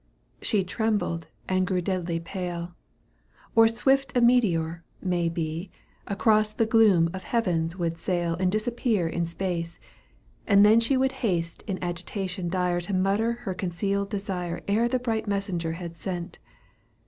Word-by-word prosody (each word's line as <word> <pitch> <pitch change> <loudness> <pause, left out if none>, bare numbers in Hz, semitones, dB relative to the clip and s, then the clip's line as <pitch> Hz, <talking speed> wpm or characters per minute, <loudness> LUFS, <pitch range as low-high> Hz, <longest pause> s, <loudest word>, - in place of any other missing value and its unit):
She 205 -4 +1
trembled 205 -4 -1 0.2
and 185 -1 +1
grew 185 -1 +1
deadly 175 -2 -1
pale. 175 0 -5 0.8
Or 225 0 +7
a - - +5
swift 270 +2 +2
meteor, 175 -10 +2 0.2
may 175 -2 0
be. 165 +2 -3 0.4
Across 215 +1 +3
the 225 - +1
gloom 210 -7 +4
of 190 - -5
heaven 180 -10 0
would 165 -2 -2
sail 175 -1 0
And 185 -1 +2
disappear 215 -3 0
in 170 +1 -1
space; 170 -1 -3 0.7
then 210 +2 +7
she 230 +4 +2
Would 265 0 +2
haste 170 -7 -1
in 195 -3 -2
agitation 180 +1 -3
dire 180 -1 0
To 185 +3 -2
mutter 200 +5 +2
her 190 - -1
concealed 195 +2 -2
desire 190 -4 -4
Ere 220 +4 +2
the 255 +2 +1
bright 225 -3 -2
messenger 195 -5 -1
had 170 0 -7
set. 175 0 -5
185 Hz, 145 wpm, -26 LUFS, 170-215 Hz, 0.8 s, Or